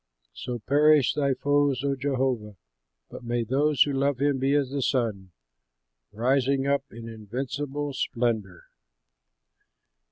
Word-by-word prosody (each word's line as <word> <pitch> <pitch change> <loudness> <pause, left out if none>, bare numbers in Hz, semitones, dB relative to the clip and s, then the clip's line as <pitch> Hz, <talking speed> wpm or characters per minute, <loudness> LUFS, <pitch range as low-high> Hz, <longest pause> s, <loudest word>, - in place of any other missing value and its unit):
"So 125 -1 -5
perish 145 +3 +4
thy 140 -3 +1
foes, 145 -2 +1
O 140 -1 0
Jehovah! 130 -6 -1 0.6
But - - -9
may 120 0 -1
those 140 +5 +3
who 145 - -3
love 140 0 +1
him 140 0 +1
be 135 +2 +2
as 140 -3 +1
the 140 0 -2
sun, 110 -8 -1 0.8
Rising 135 +4 +1
up 140 -1 +1
in 115 0 -9
invincible 135 +6 -4
splendor!" 115 -8 -2
135 Hz, 125 wpm, -26 LUFS, 120-140 Hz, 0.8 s, perish